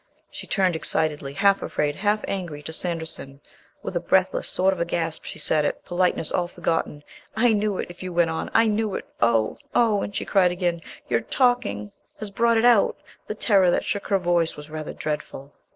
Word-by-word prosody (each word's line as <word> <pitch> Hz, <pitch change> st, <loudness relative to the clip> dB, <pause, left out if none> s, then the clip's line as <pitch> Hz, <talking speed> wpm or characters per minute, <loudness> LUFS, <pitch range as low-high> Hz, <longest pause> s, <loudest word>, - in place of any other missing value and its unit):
She -, -, -8 dB
turned 185 Hz, -3 st, +1 dB
excitedly, 150 Hz, -3 st, -1 dB
half 200 Hz, +6 st, +3 dB
afraid, 145 Hz, -1 st, -1 dB
half 210 Hz, +1 st, 0 dB
angry, 170 Hz, -7 st, -4 dB
to 160 Hz, -, -5 dB
Sanderson. 160 Hz, -5 st, -2 dB, 0.4 s
With -, -, -5 dB
a -, -, +2 dB
breathless -, -, +1 dB
sort 190 Hz, +1 st, +2 dB
of 170 Hz, -2 st, -2 dB
gasp 165 Hz, -2 st, -3 dB
she -, -, -6 dB
said 155 Hz, -1 st, +3 dB
it, -, -, -3 dB
politeness 175 Hz, -2 st, 0 dB
all 175 Hz, -1 st, 0 dB
forgotten. 165 Hz, -4 st, -2 dB, 0.3 s
"I 225 Hz, +1 st, +3 dB
knew 210 Hz, -2 st, 0 dB
it... -, -, -2 dB
if 175 Hz, -, -14 dB
you 185 Hz, -1 st, -5 dB
went 170 Hz, -1 st, +2 dB
on. 160 Hz, -, -3 dB
I 225 Hz, -, +4 dB
knew 215 Hz, -2 st, 0 dB
it. -, -, -5 dB, 0.2 s
Oh! 115 Hz, -2 st, +2 dB, 0.2 s
Oh!" 220 Hz, -4 st, +3 dB
And 200 Hz, -, -5 dB
she -, -, -2 dB
cried 190 Hz, -3 st, +3 dB
again, 175 Hz, -2 st, -1 dB, 0.3 s
"Your -, -, +1 dB
talking 245 Hz, -, 0 dB, 0.3 s
has 215 Hz, -2 st, -6 dB
brought 230 Hz, +2 st, +2 dB
it 225 Hz, -, +3 dB
out!" 235 Hz, -4 st, +5 dB, 0.3 s
The -, -, -4 dB
terror 195 Hz, -5 st, +3 dB
that -, -, +1 dB
shook 200 Hz, -, -2 dB
her 200 Hz, -, +3 dB
voice 175 Hz, -3 st, 0 dB
was 150 Hz, +1 st, -10 dB
rather 155 Hz, -1 st, -5 dB
dreadful. 150 Hz, -2 st, -5 dB
175 Hz, 200 wpm, -24 LUFS, 155-205 Hz, 0.4 s, out